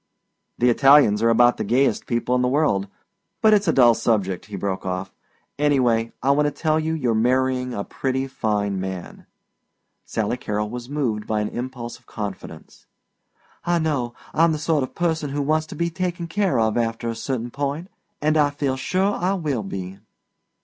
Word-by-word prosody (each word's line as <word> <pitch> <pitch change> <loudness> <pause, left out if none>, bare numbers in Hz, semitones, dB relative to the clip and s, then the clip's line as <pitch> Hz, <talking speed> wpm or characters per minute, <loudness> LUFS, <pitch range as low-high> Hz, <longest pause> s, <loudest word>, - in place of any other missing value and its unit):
"The 125 0 +4
Italians 135 -5 +5
are 115 - +4
about 120 +1 +4
the - - -2
gayest 125 +6 +1
people 120 0 0
in 125 - +2
the 125 - +2
world 125 -8 +1 0.5
but 215 -1 +5
it's 205 -2 +3
a - - +5
dull 120 -5 +6
subject," 100 -6 -1
he 105 - -7
broke 95 -2 -3
off. 90 0 -4 0.5
"Anyway, 125 -6 +2
I 135 - +4
want 150 +1 +3
to - - -1
tell 155 +1 0
you 160 +1 -1
you're 125 -7 0
marrying 125 +2 +1
a 100 - -2
pretty 130 +3 -2
fine 105 -6 -1
man." 95 -1 -6 0.8
Sally 110 +2 -2
Carrol 105 -2 -3
was 120 0 -7
moved 125 -8 -2
by 110 -1 0
an 105 - -1
impulse 120 -1 -6
of - - -33
confidence. 105 -2 -8 0.8
"I 175 0 +1
know. 145 -7 -1 0.2
I'm 165 0 +4
the - - -1
sort 150 0 +1
of 130 - -5
person 160 -4 -1
who 145 +1 -2
wants 155 +2 +1
to - - -8
be 170 0 -1
taken 180 0 -3
care 170 - 0
of 110 0 +1
after 115 0 -2
a 115 - -2
certain 120 0 -3
point, 145 +6 -3 0.4
and 155 +1 +3
I 145 -1 +4
feel 140 -2 -2
sure 190 +8 0
I 185 +2 0
will 150 - -2
be." 95 -1 -6
130 Hz, 185 wpm, -23 LUFS, 115-150 Hz, 0.8 s, dull